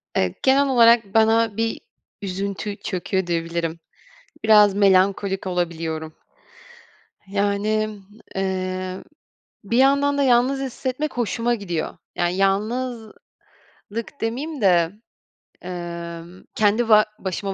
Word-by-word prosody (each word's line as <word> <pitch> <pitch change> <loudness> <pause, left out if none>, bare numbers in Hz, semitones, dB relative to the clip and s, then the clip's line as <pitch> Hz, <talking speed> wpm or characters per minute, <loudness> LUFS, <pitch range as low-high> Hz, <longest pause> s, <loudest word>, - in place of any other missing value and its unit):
evet, 90 -1 -1
genel 275 +1 +4
olarak 230 -5 +4
bana 225 -1 +3
bir 225 0 -1 0.4
üzüntü 200 +1 -4
çöküyor 190 -1 -3
diyebilirim. 165 -1 -2 0.7
Biraz 210 -2 +6
melankolik 195 0 +2
olabiliyorum. 165 -3 -3 1.1
Yani, 205 +2 0 0.5
eee, 185 -1 -3 0.6
bir 230 +4 -1
yandan 280 +2 +3
da 280 - +2
yalnız 255 +2 +3
hissetmek 260 +2 -4
hoşuma 240 +1 0
gidiyor. 175 -7 -4 0.2
Yani, 175 +1 0
yalnızlık 220 +4 -2 0.9
demiyim 265 +5 -3
de, 175 -3 +4 0.7
emm, 170 0 -7
kendi 215 +2 +2
ba 215 -1 +7
başıma 195 +1 -3
200 Hz, 95 wpm, -22 LUFS, 185-230 Hz, 1.1 s, ba